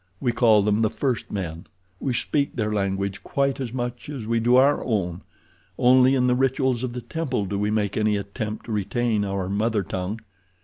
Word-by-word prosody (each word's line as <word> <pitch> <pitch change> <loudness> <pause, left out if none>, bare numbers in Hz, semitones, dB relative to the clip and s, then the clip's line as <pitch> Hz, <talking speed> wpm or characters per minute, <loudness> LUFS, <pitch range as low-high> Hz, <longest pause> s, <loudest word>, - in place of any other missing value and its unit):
We 120 - +1
call 110 -3 +4
them 105 +1 +2
the 110 - +3
first 130 0 -2
men—we 90 +4 -6
speak 140 +4 0
their 105 -3 -1
language 100 -1 -1
quite 140 0 -1
as 130 -4 -3
much 120 +1 -4
as 135 -7 -5
we 115 +1 +1
do 120 +2 +3
our 140 +3 +4
own; 95 -7 -1 0.6
only 130 +1 +5
in 125 -1 +2
the 125 - +3
rituals 130 -1 +1
of 125 -2 -3
the 125 - -5
temple 130 -8 -2
do 100 +1 -3
we 105 +1 0
make 105 -2 0
any 105 -1 +2
attempt 105 +2 -5
to 120 - -7
retain 110 +1 0
our 95 -2 -2
mother 105 +1 0
tongue. 95 +4 -4
110 Hz, 190 wpm, -24 LUFS, 100-125 Hz, 0.6 s, only